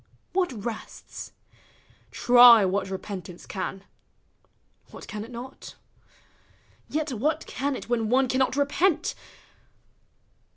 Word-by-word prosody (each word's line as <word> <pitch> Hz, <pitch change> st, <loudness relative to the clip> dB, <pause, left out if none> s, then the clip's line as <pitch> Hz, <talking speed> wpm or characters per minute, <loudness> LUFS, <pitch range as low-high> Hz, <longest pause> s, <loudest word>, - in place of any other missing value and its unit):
what 365 Hz, -3 st, +1 dB
rests? 230 Hz, -2 st, -7 dB, 0.8 s
Try 240 Hz, -3 st, +7 dB
what 190 Hz, +1 st, -1 dB
repentance 185 Hz, -2 st, -7 dB
can: 190 Hz, 0 st, -5 dB, 1.1 s
what -, -, -11 dB
can 210 Hz, 0 st, -6 dB
it 225 Hz, -, -11 dB
not? 250 Hz, +2 st, -9 dB, 1.1 s
Vet 305 Hz, -2 st, -2 dB
what 300 Hz, +7 st, -1 dB
can 280 Hz, +1 st, -2 dB
it -, -, -8 dB
when 230 Hz, -2 st, 0 dB
one 260 Hz, +2 st, +3 dB
cannot 260 Hz, +1 st, +1 dB
repent? 315 Hz, +4 st, +1 dB
245 Hz, 100 wpm, -26 LUFS, 210-285 Hz, 1.1 s, Try